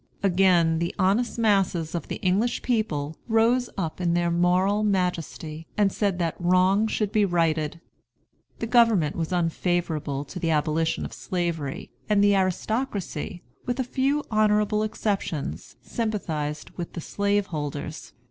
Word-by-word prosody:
Again 175 Hz, -4 st, +4 dB
the 170 Hz, 0 st, -2 dB
honest 205 Hz, +6 st, +1 dB
masses 195 Hz, -7 st, +1 dB
of 170 Hz, -, -3 dB
the -, -, -3 dB
English 200 Hz, +6 st, +1 dB
people 160 Hz, -, -1 dB
rose 235 Hz, +2 st, +3 dB
up 170 Hz, -1 st, -3 dB
in 170 Hz, -1 st, +1 dB
their 175 Hz, 0 st, +1 dB
moral 180 Hz, +4 st, +2 dB
majesty 170 Hz, -5 st, -2 dB
and 205 Hz, -2 st, +3 dB
said 200 Hz, -3 st, 0 dB
that 170 Hz, -3 st, 0 dB
wrong 185 Hz, +4 st, +3 dB
should 210 Hz, -2 st, -1 dB
be 215 Hz, -1 st, +3 dB
righted. 165 Hz, -4 st, +1 dB, 0.8 s
The -, -, -3 dB
government 225 Hz, -10 st, +4 dB
was 165 Hz, 0 st, -3 dB
unfavorable 165 Hz, -4 st, -1 dB
to 180 Hz, +6 st, -7 dB
the 165 Hz, -2 st, -1 dB
abolition 160 Hz, +1 st, +1 dB
of -, -, -7 dB
Slavery, 170 Hz, -7 st, -3 dB, 0.2 s
and 205 Hz, -1 st, +4 dB
the 205 Hz, 0 st, +5 dB
aristocracy, 190 Hz, -, -2 dB, 0.2 s
with 245 Hz, +1 st, -1 dB
a -, -, +2 dB
few 275 Hz, +4 st, 0 dB
honorable 210 Hz, 0 st, +3 dB
exceptions, 200 Hz, -8 st, -3 dB
sympathized 160 Hz, -10 st, -3 dB
with 175 Hz, -2 st, -7 dB
the 170 Hz, -, -5 dB
slaveholders. 160 Hz, -8 st, -2 dB
185 Hz, 140 wpm, -25 LUFS, 165-210 Hz, 0.8 s, the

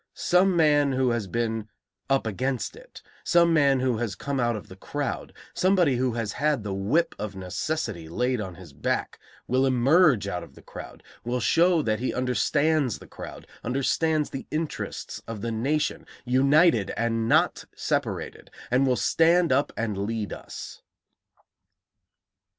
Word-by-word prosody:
Some 180 Hz, +1 st, +3 dB
man 145 Hz, -4 st, +4 dB
who 130 Hz, -1 st, +2 dB
has 115 Hz, -4 st, -2 dB
been 110 Hz, +1 st, -2 dB, 0.4 s
'up 135 Hz, -2 st, +2 dB
against 125 Hz, -, -2 dB
it,' -, -, -14 dB, 0.2 s
some 170 Hz, -1 st, +4 dB
man 140 Hz, -4 st, +4 dB
who 130 Hz, -3 st, +1 dB
has 110 Hz, -3 st, -2 dB
come 140 Hz, +5 st, -3 dB
out 120 Hz, -1 st, +1 dB
of 110 Hz, -, -7 dB
the 95 Hz, -, -11 dB
crowd, 145 Hz, +8 st, -4 dB, 0.2 s
somebody 180 Hz, -8 st, +3 dB
who 125 Hz, -1 st, 0 dB
has 115 Hz, -3 st, -2 dB
had 145 Hz, -4 st, 0 dB
the 100 Hz, -2 st, -3 dB
whip 110 Hz, +13 st, +1 dB
of 105 Hz, -1 st, -5 dB
necessity 95 Hz, -, -3 dB
laid 125 Hz, +6 st, 0 dB
on 95 Hz, -4 st, -6 dB
his 85 Hz, -5 st, -13 dB
back, 70 Hz, -, -2 dB, 0.3 s
will 130 Hz, +1 st, +1 dB
emerge 135 Hz, -, +4 dB
out 90 Hz, -3 st, -3 dB
of -, -, -13 dB
the -, -, -15 dB
crowd, -, -, -10 dB, 0.2 s
will 125 Hz, +1 st, -1 dB
show 170 Hz, +6 st, +3 dB
that 110 Hz, -3 st, 0 dB
he 130 Hz, -, -2 dB
understands 130 Hz, +2 st, +1 dB
the -, -, -14 dB
crowd, -, -, -10 dB, 0.2 s
understands 150 Hz, +5 st, 0 dB
the 135 Hz, -, -6 dB
interests 155 Hz, 0 st, -4 dB
of 115 Hz, -3 st, -6 dB
the 115 Hz, -, -2 dB
nation, 135 Hz, +7 st, -1 dB, 0.2 s
united 135 Hz, -, +4 dB
and 115 Hz, -1 st, 0 dB
not -, -, +2 dB
separated, -, -, -3 dB, 0.2 s
and 130 Hz, +2 st, +3 dB
will 130 Hz, -, +3 dB
stand 165 Hz, -, +3 dB
up 140 Hz, +3 st, +2 dB
and 105 Hz, -4 st, -2 dB
lead 105 Hz, +1 st, -3 dB
us." -, -, -9 dB
125 Hz, 155 wpm, -26 LUFS, 110-150 Hz, 0.4 s, man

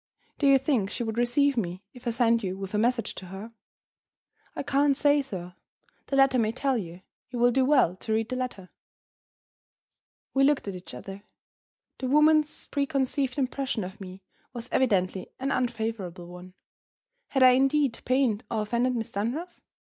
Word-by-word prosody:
"Do 285 Hz, -, +3 dB
you 275 Hz, 0 st, +7 dB
think 255 Hz, -8 st, 0 dB
she 240 Hz, -, -4 dB
would 225 Hz, 0 st, -3 dB
receive 275 Hz, +4 st, +2 dB
me 185 Hz, -2 st, -3 dB
if 250 Hz, -1 st, -11 dB
I -, -, +3 dB
sent 230 Hz, 0 st, +2 dB
you 190 Hz, 0 st, -3 dB
with 195 Hz, 0 st, -7 dB
a 210 Hz, -, +1 dB
message 230 Hz, 0 st, +1 dB
to 185 Hz, -, -9 dB
her?" 195 Hz, +5 st, -9 dB, 1.0 s
"I -, -, -3 dB
can't 280 Hz, 0 st, +2 dB
say, 290 Hz, 0 st, +4 dB
sir. 180 Hz, -9 st, -7 dB, 0.5 s
The 275 Hz, -, -1 dB
letter 270 Hz, -2 st, +4 dB
may 220 Hz, -1 st, +2 dB
tell 265 Hz, +2 st, 0 dB
you. 180 Hz, -4 st, -6 dB, 0.3 s
You 250 Hz, -, -6 dB
will 245 Hz, +1 st, +4 dB
do 265 Hz, +2 st, +2 dB
well 260 Hz, -, +3 dB
to 220 Hz, -, -6 dB
read 225 Hz, +1 st, 0 dB
the 255 Hz, -, -2 dB
letter." 245 Hz, -8 st, -5 dB, 1.6 s
We 270 Hz, -, +3 dB
looked 285 Hz, -5 st, +2 dB
at 195 Hz, -, -4 dB
each 175 Hz, -7 st, -9 dB
other. 195 Hz, +10 st, -9 dB, 0.8 s
The 260 Hz, -, -2 dB
woman's 300 Hz, +2 st, +3 dB
preconceived 275 Hz, -2 st, -1 dB
impression 260 Hz, -4 st, -1 dB
of 190 Hz, +3 st, -9 dB
me 185 Hz, 0 st, -9 dB, 0.3 s
was 240 Hz, -1 st, -6 dB
evidently 190 Hz, -7 st, +1 dB
an 270 Hz, +2 st, -1 dB
unfavorable 220 Hz, -8 st, -2 dB
one. 180 Hz, +1 st, -12 dB, 0.7 s
Had 270 Hz, -2 st, +2 dB
I 255 Hz, -, +9 dB
indeed 270 Hz, -1 st, +2 dB
pained 255 Hz, -4 st, +1 dB
or 220 Hz, -2 st, -1 dB
offended 240 Hz, +4 st, 0 dB
Miss 225 Hz, -2 st, -3 dB
Dunross? 265 Hz, -, -4 dB
240 Hz, 170 wpm, -27 LUFS, 200-270 Hz, 1.6 s, I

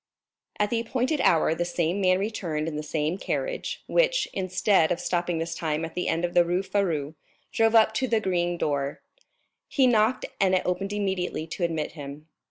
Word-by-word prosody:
At 210 Hz, 0 st, 0 dB
the 235 Hz, -, +1 dB
appointed 255 Hz, +6 st, -1 dB
hour 160 Hz, -1 st, +4 dB
the 175 Hz, -, -1 dB
same 175 Hz, +2 st, -1 dB
man 185 Hz, -1 st, +4 dB
returned 175 Hz, -7 st, -2 dB
in 160 Hz, -, -4 dB
the 150 Hz, -, -2 dB
same 155 Hz, +3 st, -2 dB
carriage, -, -, -3 dB
which, -, -, +2 dB
instead 185 Hz, -2 st, +2 dB
of 175 Hz, -, 0 dB
stopping 175 Hz, -1 st, -1 dB
this 165 Hz, +1 st, -3 dB
time 160 Hz, -1 st, -2 dB
at 165 Hz, -, -9 dB
the 180 Hz, -, -2 dB
end 165 Hz, +2 st, +1 dB
of 175 Hz, -, -4 dB
the 175 Hz, -, +6 dB
Rue 175 Hz, +2 st, 0 dB
Férou, 165 Hz, -8 st, -1 dB, 0.4 s
drove 225 Hz, 0 st, +2 dB
up 220 Hz, -1 st, +6 dB
to 260 Hz, +4 st, 0 dB
the 230 Hz, -2 st, +2 dB
green 175 Hz, -3 st, 0 dB
door. 140 Hz, -3 st, -2 dB, 0.6 s
He 270 Hz, -, +3 dB
knocked, 235 Hz, 0 st, +3 dB
and 190 Hz, -1 st, +3 dB
it 185 Hz, -, +1 dB
opened 195 Hz, +2 st, -1 dB
immediately 190 Hz, -5 st, -2 dB
to 165 Hz, +3 st, -5 dB
admit 160 Hz, -3 st, -1 dB
him. 145 Hz, -1 st, -9 dB
180 Hz, 190 wpm, -26 LUFS, 165-210 Hz, 0.6 s, the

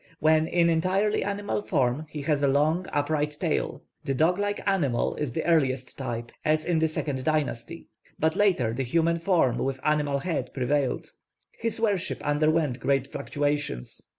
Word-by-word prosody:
When 155 Hz, +1 st, +4 dB
in 170 Hz, 0 st, +3 dB
entirely 185 Hz, +6 st, +1 dB
animal 205 Hz, +1 st, -2 dB
form 145 Hz, -5 st, 0 dB
he 150 Hz, -1 st, -6 dB
has 150 Hz, -1 st, +1 dB
a 140 Hz, -, +3 dB
long 155 Hz, +6 st, +2 dB
upright 150 Hz, 0 st, 0 dB
tail. 165 Hz, -4 st, -1 dB, 0.2 s
The 135 Hz, -3 st, -1 dB
dog 170 Hz, +7 st, +2 dB
like 205 Hz, 0 st, -1 dB
animal 150 Hz, -12 st, +1 dB
is 150 Hz, -5 st, -2 dB
the 160 Hz, -, -3 dB
earliest 135 Hz, -6 st, +1 dB
type, 120 Hz, -3 st, -5 dB
as 155 Hz, 0 st, +1 dB
in 170 Hz, -2 st, +1 dB
the 160 Hz, -, +3 dB
second 145 Hz, -4 st, -3 dB
dynasty; 155 Hz, 0 st, -2 dB, 0.3 s
but 160 Hz, 0 st, +1 dB
later 175 Hz, -, +2 dB
the 135 Hz, -, -2 dB
human 165 Hz, +6 st, +1 dB
form 165 Hz, -8 st, +2 dB
with 135 Hz, 0 st, -2 dB
animal 150 Hz, -2 st, +1 dB
head 140 Hz, -4 st, -3 dB
prevailed. 135 Hz, 0 st, 0 dB, 0.4 s
His 230 Hz, -1 st, -3 dB
worship 200 Hz, -5 st, -1 dB
underwent 150 Hz, -2 st, +1 dB
great 135 Hz, -1 st, +1 dB
fluctuations. 145 Hz, -, -3 dB
155 Hz, 160 wpm, -26 LUFS, 135-170 Hz, 0.4 s, When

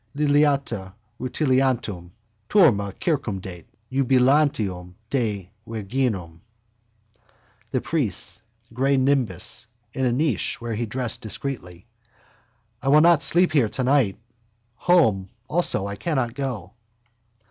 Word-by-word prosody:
Liliata 140 Hz, -9 st, +1 dB, 0.3 s
rutilantium. 130 Hz, -, 0 dB, 0.4 s
Turma 115 Hz, -, +4 dB
circumdet. 95 Hz, -, -3 dB, 0.3 s
Iubilantium 125 Hz, -9 st, +2 dB, 0.2 s
te 105 Hz, -8 st, -2 dB, 0.2 s
virginum. 105 Hz, -6 st, -3 dB, 1.3 s
The -, -, -1 dB
priest's 115 Hz, -, -1 dB, 0.3 s
grey 135 Hz, +3 st, +2 dB
nimbus 125 Hz, -8 st, +1 dB, 0.3 s
in 130 Hz, -, -1 dB
a -, -, +2 dB
niche 135 Hz, -1 st, 0 dB
where 120 Hz, -1 st, -4 dB
he 115 Hz, +2 st, -2 dB
dressed 120 Hz, +1 st, -3 dB
discreetly. 105 Hz, -6 st, -6 dB, 1.0 s
I -, -, -5 dB
will 150 Hz, +2 st, +6 dB
not 170 Hz, -2 st, +5 dB
sleep 175 Hz, +3 st, +3 dB
here 135 Hz, -8 st, +3 dB
tonight. 130 Hz, -6 st, +1 dB, 0.6 s
Home 110 Hz, -, +3 dB, 0.2 s
also 155 Hz, -, +2 dB
I 100 Hz, 0 st, -5 dB
cannot 130 Hz, -8 st, -1 dB
go. 120 Hz, -, -5 dB
125 Hz, 100 wpm, -23 LUFS, 100-140 Hz, 1.3 s, will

